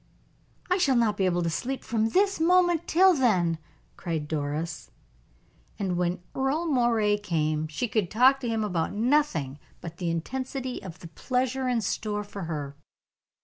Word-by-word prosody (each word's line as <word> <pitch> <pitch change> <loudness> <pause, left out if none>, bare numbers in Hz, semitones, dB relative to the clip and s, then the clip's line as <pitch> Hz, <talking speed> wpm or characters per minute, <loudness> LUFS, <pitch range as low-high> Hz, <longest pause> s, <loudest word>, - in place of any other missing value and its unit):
"I 365 +1 +1
shall 275 -7 +3
not 230 -3 +2
be 195 - 0
able 175 -1 +1
to 170 - 0
sleep 260 +11 -3
from 225 -1 0
this 395 - +2
moment 350 0 +3
till 375 +3 +5
then," 185 - +2 0.4
cried 160 -4 -3
Doris. 155 +2 -3 0.9
And 190 -3 -1
when 175 0 -1
Earle 270 +5 0
Moray 235 -8 +2
came 155 -5 -1
she 155 +11 -3
could 210 -4 0
talk 260 +4 +5
to 245 -3 -3
him 225 -1 0
about 180 -5 -1
nothing 215 - +1 0.2
but 170 0 -9
the 175 -2 -2
intensity 255 - -4
of 180 -3 -9
the 170 - -10
pleasure 255 - -1
in 245 -2 +1
store 210 +1 -2
for 200 -2 -7
her. 145 -3 -5
215 Hz, 160 wpm, -27 LUFS, 170-265 Hz, 0.9 s, till